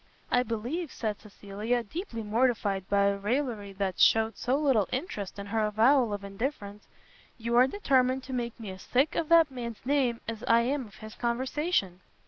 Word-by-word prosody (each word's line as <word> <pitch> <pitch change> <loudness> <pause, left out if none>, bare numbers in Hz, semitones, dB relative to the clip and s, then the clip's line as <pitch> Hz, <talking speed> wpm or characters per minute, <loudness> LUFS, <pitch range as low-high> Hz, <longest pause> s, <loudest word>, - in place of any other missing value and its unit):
"I 245 - +4
believe," 250 +8 -3
said 215 -3 -3
Cecilia, 210 +3 -3
deeply 235 - -6
mortified 210 -4 0
by 200 0 +3
a 200 0 +1
raillery 220 -2 -2
that 190 -2 -3
shewed 225 -1 +4
so 250 +2 0
little 265 -9 +2
interest 230 - -4
in 200 - -6
her 220 +2 0
avowal 225 +3 +3
of 205 -1 -4
indifference, 205 0 -5 0.5
"you 235 0 -2
are 250 +2 +6
determined 265 -6 +1
to 260 - -7
make 240 -2 -3
me 215 -4 -6
as 185 0 -10
sick 265 +5 +1
of 320 - -2
that 330 -3 +6
man's 235 -3 -7
name, 260 -4 +1
as 225 0 -5
I 230 0 +5
am 260 +1 -1
of 205 - -17
his 215 0 -10
conversation." 240 - -1
235 Hz, 180 wpm, -28 LUFS, 205-260 Hz, 0.5 s, are